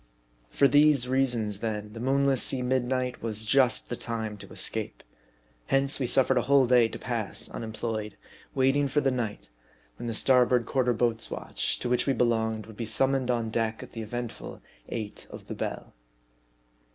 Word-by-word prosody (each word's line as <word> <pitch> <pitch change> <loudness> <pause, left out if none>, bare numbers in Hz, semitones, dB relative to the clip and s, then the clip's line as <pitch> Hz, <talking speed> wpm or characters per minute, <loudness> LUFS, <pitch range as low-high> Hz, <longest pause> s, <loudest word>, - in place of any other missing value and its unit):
For 140 - +4
these 145 -3 +4
reasons 120 -6 0
then, 105 -1 -4
the 115 - -8
moonless 135 +1 +2
sea 130 -2 +1
midnight 125 0 -1
was 110 -1 -3
just 125 +1 +3
the 120 - -2
time 110 -3 -4
to - - -12
escape. - - -2 0.6
Hence, 135 +1 +2
we 130 - 0
suffered 130 +1 +3
a 125 - -4
whole 140 -2 +6
day 120 -2 +5
to - - -7
pass - - -3
unemployed; 110 -1 -5 0.4
waiting 135 +2 +3
for 140 +2 +1
the 135 -2 +1
night, 110 - -4 0.5
when 120 - -6
the 115 - -2
star 130 +3 +4
MARDI. 125 - +3
37 125 -2 +2
board - - -11
quarter 125 -2 +2
boats' 115 -1 0
watch, - - -3
to - - -2
which 125 +2 +1
we 135 - +3
belonged, 110 -3 0
would 110 -1 -13
be 115 - -3
summoned 135 +3 +1
on 115 -2 0
deck 115 -1 -1
at - - -12
the 115 - -6
eventful 120 +2 -6 0.3
eight 110 -3 -5
of - - -10
the - - -6
bell. - - -5
120 Hz, 185 wpm, -27 LUFS, 110-130 Hz, 0.6 s, whole